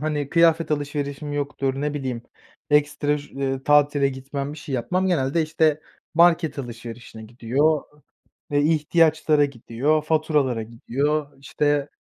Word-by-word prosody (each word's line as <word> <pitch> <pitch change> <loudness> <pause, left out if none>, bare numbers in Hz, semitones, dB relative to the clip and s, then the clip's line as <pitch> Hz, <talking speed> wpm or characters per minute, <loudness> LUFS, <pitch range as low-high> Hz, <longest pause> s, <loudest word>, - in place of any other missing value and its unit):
hani, 150 -2 -2
kıyafet 165 0 +3
alışverişim 145 0 -3
yoktur, 140 -2 -2
ne 150 0 -2
bileyim, 130 -5 -4 0.5
ekstra 150 0 +2
ş 135 -2 -4
tatile 145 -1 +4
gitmem, 135 +1 -5
bir 155 - -10
şey 145 -2 -6
yapmam. 180 +10 0
Genelde, 165 -3 +1
işte, 155 -1 +1 0.3
market 170 -2 +3
alışverişine 120 -2 -8
gidiyor, 125 +7 0 0.7
eee, 145 - +2
ihtiyaçlara 155 -1 +3
gidiyor, 140 +3 -1
faturalara 150 -7 +1
gidiyor, 140 +6 -2
işte, 145 +1 0
145 Hz, 120 wpm, -23 LUFS, 135-155 Hz, 0.7 s, tatile